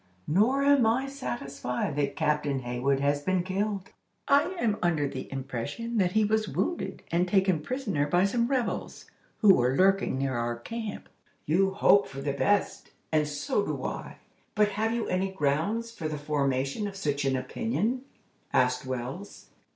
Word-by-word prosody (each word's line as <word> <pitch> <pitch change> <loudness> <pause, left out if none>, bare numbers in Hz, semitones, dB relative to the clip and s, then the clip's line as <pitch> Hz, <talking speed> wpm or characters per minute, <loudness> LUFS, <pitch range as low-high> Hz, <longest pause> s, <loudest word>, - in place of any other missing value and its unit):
Nor 230 - +3
am 280 -4 +5
I 245 +4 +2
satisfied 140 - -4
that 140 -1 -1
Captain 150 -3 0
Hayward 125 +3 0
has 145 0 +1
been 185 +2 +1
killed. 195 +1 -2 0.4
I 280 +2 +5
am 215 -6 +1
under 160 -5 +1
the - - -7
impression 140 - -4
that 180 -3 +2
he 220 -1 +4
was 215 0 +1
wounded 345 - -2
and 175 +2 +2
taken 190 -3 +3
prisoner 200 - -1
by 175 +5 +3
some 235 +4 +1
rebels, 255 -3 -2 0.4
who 205 -4 +8
were 125 -2 +2
lurking 195 -7 +3
near 135 0 -1
our 120 0 -1
camp." 220 - -6 0.4
"You 190 +5 +2
hope 200 0 +5
for 135 - -8
the 140 -1 -1
best, 200 +8 0 0.2
and 155 -1 +2
so 200 - -1
do - - -3
I; - - -5 0.4
but 210 0 +4
have 220 +2 -1
you 235 -1 -1
any 185 +1 0
grounds 190 +9 0
for 165 -9 -5
the 155 -1 -3
formation 140 +4 -1
of 200 - -7
such 145 -7 -1
an 135 -1 +1
opinion?" 230 - -1 0.5
asked 125 0 +2
Wells. 130 +10 -6
180 Hz, 165 wpm, -28 LUFS, 140-215 Hz, 0.5 s, who